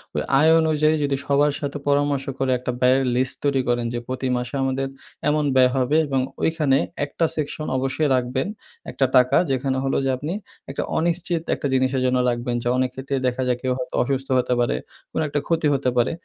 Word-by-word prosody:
ওই -, -, +1 dB, 0.2 s
আয় 160 Hz, +2 st, +5 dB
অনুযায়ী 155 Hz, -1 st, +2 dB
যদি 140 Hz, -1 st, +1 dB
সবার 145 Hz, +1 st, +3 dB
সাথে 145 Hz, 0 st, -3 dB
পরামর্শ 145 Hz, -1 st, +1 dB
করে 135 Hz, -1 st, +1 dB
একটা 125 Hz, 0 st, -3 dB
ব্যয়ের 130 Hz, +1 st, +4 dB
লিস্ট 130 Hz, +1 st, 0 dB
তৈরি 140 Hz, -2 st, +2 dB
করেন 120 Hz, -1 st, +1 dB
যে 120 Hz, -, -2 dB
প্রতি 130 Hz, +1 st, -3 dB
মাসে 125 Hz, +2 st, -4 dB
আমাদের 135 Hz, 0 st, -1 dB, 0.4 s
এমন 150 Hz, 0 st, +1 dB
ব্যয় 130 Hz, -1 st, +5 dB
হবে 130 Hz, +4 st, +2 dB
এবং 135 Hz, -1 st, 0 dB, 0.2 s
ওইখানে 155 Hz, -5 st, +2 dB, 0.3 s
একটা 165 Hz, +3 st, -1 dB
সেকশন 155 Hz, 0 st, -3 dB
অবশ্যই 135 Hz, +3 st, 0 dB
রাখবেন। 130 Hz, +4 st, -1 dB, 0.4 s
একটা 135 Hz, -, +1 dB
টাকা 125 Hz, 0 st, +4 dB
যেখানে 130 Hz, 0 st, 0 dB
হল 135 Hz, -, 0 dB
যে -, -, +1 dB
আপনি 150 Hz, +6 st, -4 dB, 0.4 s
একটা 135 Hz, -, -3 dB
অনিশ্চিত 170 Hz, 0 st, 0 dB
একটা 140 Hz, -, -3 dB
জিনিসের 130 Hz, 0 st, +1 dB
জন্য 125 Hz, 0 st, +2 dB
রাখবেন 120 Hz, 0 st, -2 dB
যে -, -, -2 dB
অনেক 130 Hz, 0 st, +1 dB
ক্ষেত্রে 135 Hz, +1 st, -3 dB
দেখা 125 Hz, +1 st, -1 dB
যায় 125 Hz, -1 st, +1 dB
কেউ 130 Hz, -1 st, -1 dB
হয়তো 125 Hz, -, -5 dB
অসুস্থ 135 Hz, +1 st, -2 dB
হতে 125 Hz, -, 0 dB
পারে, 120 Hz, -, +1 dB, 0.4 s
কোনো -, -, -1 dB
একটা 145 Hz, 0 st, -1 dB
ক্ষতি 165 Hz, -2 st, +1 dB
হতে 135 Hz, -1 st, +1 dB
পারে। 120 Hz, -, +3 dB
135 Hz, 195 wpm, -22 LUFS, 130-145 Hz, 0.4 s, আয়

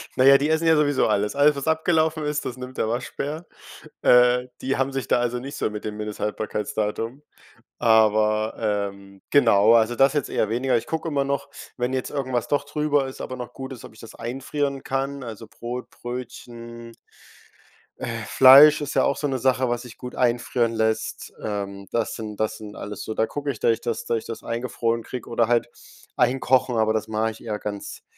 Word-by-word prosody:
Na 130 Hz, -, +3 dB
ja, 135 Hz, +1 st, +8 dB
die 145 Hz, +3 st, -1 dB
essen 160 Hz, +1 st, +1 dB
ja 160 Hz, -, +6 dB
sowieso 145 Hz, -3 st, +2 dB
alles. 105 Hz, +1 st, 0 dB
Alles, 145 Hz, +1 st, +5 dB
was 140 Hz, +2 st, -5 dB
abgelaufen 160 Hz, -1 st, +1 dB
ist, 150 Hz, 0 st, -2 dB
das 125 Hz, -, -5 dB
nimmt 125 Hz, 0 st, -8 dB
der -, -, 0 dB
Waschbär. 140 Hz, +6 st, -4 dB, 0.6 s
Äh, 125 Hz, 0 st, +5 dB
die 135 Hz, +1 st, -1 dB
haben 135 Hz, +1 st, 0 dB
sich 135 Hz, -4 st, -4 dB
da -, -, +3 dB
also 120 Hz, 0 st, -1 dB
nicht 140 Hz, +3 st, -7 dB
so -, -, 0 dB
mit 105 Hz, 0 st, -7 dB
dem 105 Hz, -1 st, -4 dB
Mindesthaltbarkeitsdatum, 105 Hz, +3 st, -3 dB, 0.6 s
aber, 110 Hz, -1 st, +3 dB
ähm, 100 Hz, -2 st, -3 dB
genau. 115 Hz, -5 st, +5 dB
Also, 115 Hz, +1 st, +3 dB
das 135 Hz, +2 st, +4 dB
jetzt 145 Hz, -, -1 dB
eher 110 Hz, -, 0 dB
weniger. 125 Hz, +1 st, +1 dB
Ich 115 Hz, -, -5 dB
gucke 160 Hz, +1 st, -3 dB
immer 140 Hz, -2 st, +1 dB
noch, 140 Hz, 0 st, -2 dB, 0.3 s
wenn 125 Hz, +1 st, -1 dB
jetzt 130 Hz, -, -2 dB
irgendwas 130 Hz, -4 st, -2 dB
doch 145 Hz, 0 st, 0 dB
drüber 145 Hz, -2 st, 0 dB
ist, 130 Hz, -, -9 dB
aber 130 Hz, -, -6 dB
noch 125 Hz, -1 st, -7 dB
gut 130 Hz, 0 st, -7 dB
ist, 125 Hz, -, -11 dB
ob -, -, -13 dB
ich 110 Hz, -, -18 dB
das 115 Hz, -, -12 dB
einfrieren 135 Hz, +3 st, -3 dB
kann, 135 Hz, +1 st, -3 dB
also 115 Hz, -1 st, -8 dB
Brot, 120 Hz, +3 st, -7 dB
Brötchen 120 Hz, -1 st, -8 dB, 1.1 s
äh, -, -, -4 dB
Fleisch 140 Hz, +4 st, +8 dB
ist 145 Hz, 0 st, -4 dB
ja -, -, +3 dB
auch 140 Hz, -, +1 dB
so 145 Hz, -, -1 dB
'ne 130 Hz, -2 st, -2 dB
Sache, 130 Hz, 0 st, +2 dB
was 120 Hz, 0 st, -1 dB
sich 125 Hz, -3 st, -12 dB
gut 125 Hz, 0 st, -8 dB
einfrieren 120 Hz, -1 st, +1 dB
lässt. 110 Hz, -1 st, -2 dB
Ähm, 100 Hz, -2 st, -4 dB
das 115 Hz, -1 st, -1 dB
sind 105 Hz, -2 st, -7 dB
das 110 Hz, 0 st, -1 dB
sind 105 Hz, -1 st, -10 dB
alles 105 Hz, -1 st, -7 dB
so, 110 Hz, -, -4 dB
da 110 Hz, -, +2 dB
gucke 145 Hz, +4 st, -5 dB
ich, 120 Hz, -, -9 dB
dass -, -, +3 dB
ich 115 Hz, -, -2 dB
das 115 Hz, -, -3 dB
dass 115 Hz, -, 0 dB
ich -, -, -13 dB
das 115 Hz, -, -7 dB
eingefroren 115 Hz, -1 st, -2 dB
krieg 125 Hz, +2 st, -7 dB
oder 115 Hz, -1 st, +1 dB
halt 120 Hz, 0 st, +2 dB, 0.5 s
einkochen, 130 Hz, 0 st, +2 dB
aber 110 Hz, 0 st, +2 dB
das 110 Hz, -1 st, -2 dB
mache 110 Hz, +1 st, -1 dB
ich 110 Hz, -, -14 dB
eher 110 Hz, -2 st, -3 dB
ganz 100 Hz, -1 st, -6 dB
120 Hz, 205 wpm, -24 LUFS, 110-135 Hz, 1.1 s, ja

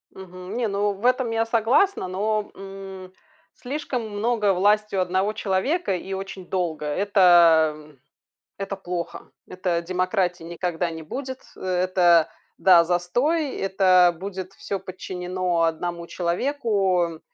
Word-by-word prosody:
Мгм. 185 Hz, +2 st, -9 dB
Не, 240 Hz, -2 st, 0 dB
ну 205 Hz, +1 st, 0 dB
в 200 Hz, +3 st, -11 dB
этом 255 Hz, -1 st, +2 dB
я 225 Hz, 0 st, +1 dB
согласна, 230 Hz, -, +2 dB
но, 210 Hz, +3 st, -1 dB
м, 195 Hz, -1 st, -9 dB, 0.4 s
слишком 255 Hz, -3 st, -4 dB
много 210 Hz, 0 st, +1 dB
власти 210 Hz, +3 st, +2 dB
у -, -, +2 dB
1 185 Hz, +3 st, 0 dB
человека, 210 Hz, -, 0 dB
и 190 Hz, +2 st, -7 dB
очень 190 Hz, -1 st, -6 dB
долго,- 170 Hz, -5 st, -2 dB
это, 170 Hz, -3 st, +5 dB
м, 150 Hz, -2 st, -16 dB, 0.6 s
это 195 Hz, 0 st, -4 dB
плохо, 180 Hz, -2 st, -6 dB, 0.2 s
это 180 Hz, -2 st, -2 dB
демократией 180 Hz, -1 st, -1 dB
никогда 175 Hz, 0 st, -2 dB
не 160 Hz, -1 st, -7 dB
будет, 260 Hz, -, -6 dB, 0.2 s
это 180 Hz, -3 st, +3 dB, 0.3 s
да, 175 Hz, -3 st, +6 dB
застой, 245 Hz, -, 0 dB
это 185 Hz, -2 st, +4 dB
будет 190 Hz, 0 st, -6 dB
всё 195 Hz, 0 st, -5 dB
подчинено 180 Hz, -1 st, -3 dB
1 170 Hz, +1 st, -2 dB
человеку. 185 Hz, -, 0 dB
190 Hz, 125 wpm, -24 LUFS, 175-210 Hz, 0.6 s, да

